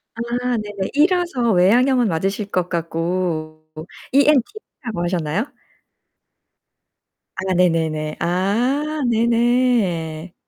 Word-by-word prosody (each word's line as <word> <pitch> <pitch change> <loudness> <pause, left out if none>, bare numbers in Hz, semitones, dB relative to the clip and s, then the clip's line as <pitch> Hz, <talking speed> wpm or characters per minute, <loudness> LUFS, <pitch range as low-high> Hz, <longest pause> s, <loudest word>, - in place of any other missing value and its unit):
아 240 +1 -2
네네. 205 -2 -4
E라서 305 - +2
외양형은 240 +7 +4
맞으실 195 +4 -2
것 180 -1 0
같고 165 -2 -3 0.5
ENTP라고 275 - 0
하셨나요? 175 - -2 1.9
아 190 0 -1
네 180 0 +5
네 165 -1 0
네. 155 0 -4
아 245 - 0
네 230 0 +2
네. 230 -9 +1
200 Hz, 190 characters per minute, -20 LUFS, 170-245 Hz, 1.9 s, 네